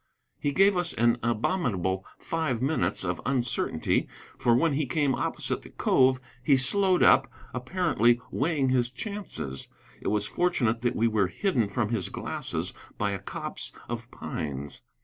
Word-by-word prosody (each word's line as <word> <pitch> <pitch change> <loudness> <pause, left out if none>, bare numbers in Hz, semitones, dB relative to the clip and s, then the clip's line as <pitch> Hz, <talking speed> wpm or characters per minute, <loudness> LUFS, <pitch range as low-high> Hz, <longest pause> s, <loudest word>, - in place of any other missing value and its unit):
He 145 - 0
gave 195 +5 +5
us 175 -1 0
an 120 +1 +2
abominable 105 - 0
five 160 -8 -1
minutes 125 - 0
of 90 -2 -2
uncertainty. 125 -4 0 0.3
For 120 -1 +3
when 155 +5 +3
he 145 0 0
came 140 0 +1
opposite - - -2
the - - -13
cove 130 0 +3 0.2
he 135 +1 +4
slowed 185 +8 +3
up, - - +5 0.2
apparently 125 - +2
weighing 145 -3 +1
his 125 -2 +2
chances. 160 - -5 0.3
It - - -5
was 105 -1 +1
fortunate 120 -8 +1
that 120 -1 0
we 115 - +3
were 105 -4 +2
hidden 120 - 0
from 105 +1 -1
his 110 -6 0
glasses - - -3 0.2
by 105 -1 0
a 100 - -3
copse - - -5 0.2
of 115 0 -5
pines. 70 -2 -5
125 Hz, 150 wpm, -28 LUFS, 105-150 Hz, 0.3 s, gave